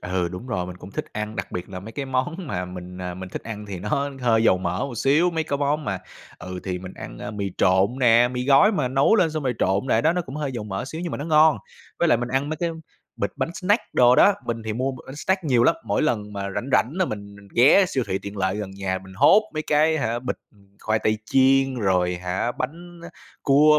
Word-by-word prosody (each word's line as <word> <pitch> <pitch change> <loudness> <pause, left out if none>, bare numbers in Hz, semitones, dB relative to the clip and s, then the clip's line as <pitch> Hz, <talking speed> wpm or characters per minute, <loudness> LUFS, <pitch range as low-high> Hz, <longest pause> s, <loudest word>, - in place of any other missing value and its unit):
Ừ, 90 -1 -1
đúng 90 +8 -8
rồi, 90 -7 -2
mình 90 0 -8
cũng 90 +2 -11
thích - - -4
ăn, 105 +1 -4
đặc - - -5
biệt 90 +2 -5
là 90 -1 -7
mấy 110 +4 -10
cái 140 - -4
món 130 +5 -1
mà 90 -7 -3
mình, 90 0 -9
à, 90 -1 -4
mình 95 0 -7
thích - - -6
ăn 105 -2 -7
thì 95 -3 -5
nó 140 +9 -1
hơi 115 -2 +3
dầu 95 - +4
mỡ 95 - -2
một 135 - -7
xíu. 150 +8 +3
Mấy 160 -1 -1
cái 140 - -1
món 145 +1 0
mà 95 -5 -2 0.4
ừ, 90 0 -7
thì 90 -2 -3
mình 95 0 -9
ăn, - - -9
ơ, 105 - -6
mì 100 -2 -3
trộn 95 +7 +3
nè, 120 0 +5
mì 125 0 -3
gói 145 +10 +6
mà 150 - 0
nấu 135 - +3
lên 175 -5 +3
xong 155 -1 -3
rồi 125 -3 0
trộn 95 +6 +1
lại 115 -3 +2
đó, 160 - +4
nó 180 - -1
cũng 135 -3 -10
hơi 145 -3 -3
dầu 115 -4 -5
mỡ 95 0 -4
xíu 160 +4 -6
nhưng 175 -1 -4
mà - - -3
nó 145 - -4
ngon. 155 0 +5 0.4
Với 170 - +2
lại 120 - +4
mình 120 - -3
ăn 135 +3 0
mấy 155 - -3
cái 170 +1 -1 0.5
bịch - - -1
bánh 170 - -2
snack 205 +5 +1
đồ 125 0 +6
đó, 200 - +6
mình 115 -1 -3
thì 110 - -2
mua 130 +4 -1
b - - -9
bánh 135 +2 -9
snack 190 +3 -1
nhiều 125 -5 +3
lắm, 165 - +5
mỗi - - 0
lần 105 -8 -1
mà 100 -1 -4
rảnh 130 - -3
rảnh 125 0 +3
là 185 +2 +1
mình 100 -5 -6
mình 100 -1 -16
ghé 140 +11 +6
siêu 130 -7 -1
thị 95 - -1
tiện 100 +1 -8
lợi 95 0 0
gần 105 -2 -5
nhà 95 -1 -3
mình 95 - -13
hốt 145 - +6
mấy 155 - -2
cái 155 +1 +2
hả, 120 -3 -1
bịch, 125 - -4 0.4
khoai 110 0 0
tây 110 0 0
chiên 135 +1 +3
rồi 90 -5 +1
hả 90 +7 -2
bánh 170 +5 -6
á 170 - -8 0.3
cua, 150 +2 +5
120 Hz, 265 wpm, -23 LUFS, 100-145 Hz, 0.5 s, gói